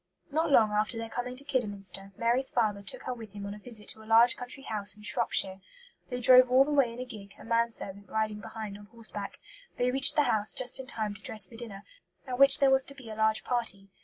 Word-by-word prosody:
Not 320 +3 0
long 220 -5 +5
after 215 +3 0
their 225 0 -5
coming 250 +1 -4
to 270 - -6
Kidderminster, 200 -7 -2
Mary's 240 +3 +1
father 215 -4 0
took 195 - -6
her 255 - -3
with 225 -4 -11
him 200 -1 -7
on 200 - -5
a 210 - -10
visit 215 -1 -7
to 220 - -8
a - - -14
large 230 +2 +6
country 250 +2 -6
house 210 -4 +2
in 210 - -15
Shropshire. 190 -2 0 0.5
They 250 -1 -4
drove 255 +1 +7
all 260 +2 +5
the 300 - -3
way 275 -5 +3
in 235 - -10
a 255 - -4
gig, 210 -5 -12
a - - -13
man 230 +1 +1
servant 200 -3 -9
riding 215 -1 -2
behind 210 -1 -8
on 205 - -14
horseback. 215 -2 -6 0.4
They 250 0 +1
reached 275 +3 +5
the 295 - +4
house 215 -5 +1
just 255 0 +2
in 260 - -8
time 215 -4 -4
to 205 - -14
dress 215 -3 -1
for 210 - -15
dinner, 215 -4 -9 0.4
at 255 -2 -5
which 275 0 +8
there 275 -1 +4
was 265 0 +4
to 280 - -10
be 250 -5 -11
a - - -7
large 220 0 +1
party. 215 -5 -2
225 Hz, 250 wpm, -29 LUFS, 210-255 Hz, 0.5 s, which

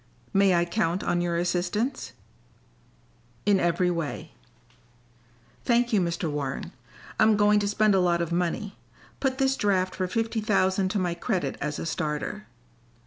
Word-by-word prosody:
"May 195 -2 +4
I 170 0 +2
count 175 -1 -1
on 175 - 0
your 170 -1 -1
assistance?" 180 +9 -1 1.3
"In 200 -2 +4
every 180 +1 +1
way." 165 -4 -4 1.3
"Thank 240 -1 +2
you, 205 - +4
Mr. 170 -1 -1
Warren, 145 -3 -4 0.5
I'm 215 -1 +5
going 210 0 +4
to 205 - -1
spend 210 0 +3
a 190 - +4
lot 175 -1 +2
of 170 -1 -2
money. 180 +4 -2 0.4
Put 265 -1 0
this 270 -1 +2
draft 190 -4 +1
for 185 -1 -2
fifty 225 +3 -1
thousand 190 -3 +1
to 205 - -1
my 180 -3 0
credit 170 - -2
as 150 0 -2
a - - -4
starter." 150 -2 -3
185 Hz, 150 wpm, -26 LUFS, 170-210 Hz, 1.3 s, I'm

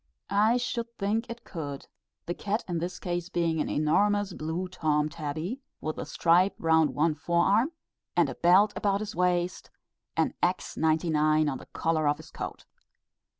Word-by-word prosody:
I 215 +4 +4
should 240 -1 -2
think 215 +4 -1
it 235 0 -7
could; 145 -5 -6 0.4
the 175 - -2
cat 210 +5 -2
in 175 -2 -1
this 175 +2 -4
case 175 -1 -3
being 165 -3 0
an - - -2
enormous 205 +6 +2
blue 165 +4 -3
Tom 155 -4 0
tabby, 155 - -4 0.2
with 155 0 -4
a - - -5
stripe 175 +3 +3
round 160 -1 +3
one 155 +2 +2
forearm, 175 - +2 0.4
and - - +4
a - - -4
belt 190 +5 +4
about 200 0 +1
his 215 - -5
waist, 180 0 0 0.5
and - - +2
X 180 +1 0
99 155 -1 +2
on 135 -3 -2
the - - -13
collar 160 -2 0
of 145 0 +2
his - - -13
coat. - - -6
175 Hz, 165 wpm, -28 LUFS, 155-200 Hz, 0.5 s, I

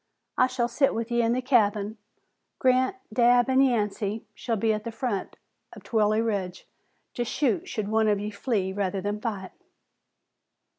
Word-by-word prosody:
I 255 - +4
shall 250 -2 -1
sit 270 +3 +1
with 230 +1 -3
ye 235 0 +2
in 230 0 +2
the 255 +1 -1
cabin. 215 -4 +1 0.6
Grant, 260 +6 +2 0.2
Dabb 245 0 +4
an' 260 +1 +5
Yancey 215 -4 0
shall 230 - -2
be 220 +1 +1
at 215 0 -3
the 230 - -5
foot 225 -3 -3 0.4
of - - -12
Trilley 215 0 +2
Ridge, 190 -5 -3 0.5
to 240 - -1
shoot 245 -1 -1
should 215 -2 -3
one 220 +1 +2
of 205 -1 +2
ye 210 +1 -4
flee 205 -3 -1
rather 195 -1 -1
than 205 +2 -3
fight." 200 -5 -4
220 Hz, 165 wpm, -26 LUFS, 205-245 Hz, 0.6 s, an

